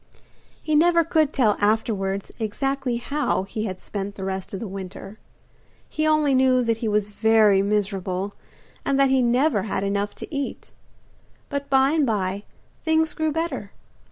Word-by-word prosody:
He 310 Hz, -, -1 dB
never 335 Hz, +2 st, +5 dB
could 315 Hz, -2 st, +2 dB
tell 225 Hz, -8 st, +2 dB
afterwards 205 Hz, -2 st, 0 dB
exactly 255 Hz, +3 st, -1 dB
how 280 Hz, -4 st, -1 dB
he 215 Hz, +3 st, -4 dB
had 185 Hz, -3 st, -5 dB
spent 200 Hz, 0 st, -5 dB
the 190 Hz, -, -5 dB
rest 190 Hz, -1 st, -4 dB
of 195 Hz, -, -5 dB
the 225 Hz, -, -5 dB
winter. 195 Hz, +2 st, -8 dB, 0.7 s
He 310 Hz, 0 st, -1 dB
only 305 Hz, -2 st, +3 dB
knew 255 Hz, -1 st, +4 dB
that 230 Hz, -1 st, +1 dB
he 225 Hz, -, -3 dB
was 210 Hz, -1 st, +1 dB
very 215 Hz, -2 st, +4 dB
miserable 195 Hz, -1 st, -1 dB, 0.5 s
and 275 Hz, 0 st, +1 dB
that 275 Hz, -1 st, +4 dB
he 265 Hz, -1 st, +4 dB
never 245 Hz, -1 st, +2 dB
had 195 Hz, -1 st, -2 dB
enough 200 Hz, +1 st, -1 dB
to 305 Hz, -, -8 dB
eat. 280 Hz, -1 st, -4 dB, 0.8 s
But 280 Hz, 0 st, -4 dB
by 270 Hz, 0 st, +4 dB
and 305 Hz, -3 st, +2 dB
by 200 Hz, -2 st, -1 dB, 0.4 s
things 320 Hz, 0 st, +2 dB
grew 315 Hz, -1 st, -1 dB
better. 295 Hz, -10 st, -3 dB
225 Hz, 160 wpm, -23 LUFS, 200-280 Hz, 0.8 s, never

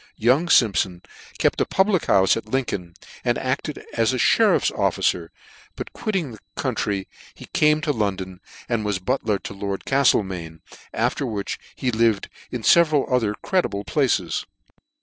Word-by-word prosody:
Young 130 Hz, +10 st, +3 dB
Simpfon 95 Hz, -, +3 dB, 0.3 s
kept -, -, +1 dB
a -, -, +3 dB
public 190 Hz, -2 st, +2 dB
houle 95 Hz, -, +4 dB
at 110 Hz, +3 st, +1 dB
Lincoln, 100 Hz, -9 st, -3 dB, 0.3 s
and 120 Hz, -1 st, +1 dB
acted 130 Hz, -, -3 dB
as -, -, +2 dB
a -, -, 0 dB
merifPs -, -, +3 dB
officer; -, -, 0 dB, 0.4 s
but -, -, -7 dB
quitting 190 Hz, -, -2 dB
the 110 Hz, -, -11 dB, 0.2 s
country, 100 Hz, -2 st, -2 dB, 0.3 s
he -, -, -11 dB
came 150 Hz, 0 st, +3 dB
to 150 Hz, -, 0 dB
London, 95 Hz, -6 st, -3 dB, 0.3 s
and 115 Hz, -3 st, -1 dB
was 105 Hz, -2 st, 0 dB
butler 105 Hz, +1 st, -1 dB
to 100 Hz, -, -8 dB
Lord 100 Hz, 0 st, -4 dB
Caftlemain; 95 Hz, -, +1 dB, 0.3 s
after -, -, -1 dB
which 105 Hz, -4 st, -4 dB, 0.2 s
he 125 Hz, -, -1 dB
lived 110 Hz, -3 st, +1 dB, 0.2 s
in 125 Hz, -3 st, -5 dB
feveral 155 Hz, -3 st, +4 dB
other 110 Hz, -5 st, +1 dB
creditable 175 Hz, -, 0 dB
places. 135 Hz, 0 st, 0 dB
115 Hz, 150 wpm, -23 LUFS, 100-140 Hz, 0.4 s, houle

